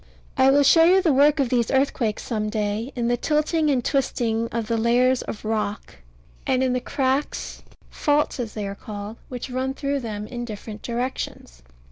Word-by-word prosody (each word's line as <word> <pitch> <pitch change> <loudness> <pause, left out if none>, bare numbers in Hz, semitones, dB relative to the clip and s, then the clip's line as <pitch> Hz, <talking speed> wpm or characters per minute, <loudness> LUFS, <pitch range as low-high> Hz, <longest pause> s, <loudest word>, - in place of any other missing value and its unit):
I 265 0 +5
will 285 +1 +5
show 325 +4 +6
you 365 +3 +6
the 340 -6 +2
work 290 +3 +4
of 270 -3 +2
these 235 -2 +1
earthquakes 265 -5 0
some 215 -3 -2
day, 210 +4 -2
in 240 -2 -1
the 240 0 +1
tilting 305 +3 +1
and 255 -4 +1
twisting 230 -4 0
of 230 -1 -3
the 230 - -1
layers 245 +3 +3
of 215 - -7
rock, 215 - -3 0.5
and 255 0 +2
in 255 -1 +1
the 250 - -1
cracks 270 +1 -2 0.3
(faults, 295 -2 +1
as 230 -3 -4
they 210 -2 -3
are 195 - -4
called) 205 +2 -8
which 250 +1 -6
run 260 +1 -2
through 280 0 -1
them 210 -4 -5
in 240 +2 -6
different 215 -1 -8
directions. 235 - -4
245 Hz, 185 wpm, -23 LUFS, 220-275 Hz, 0.5 s, show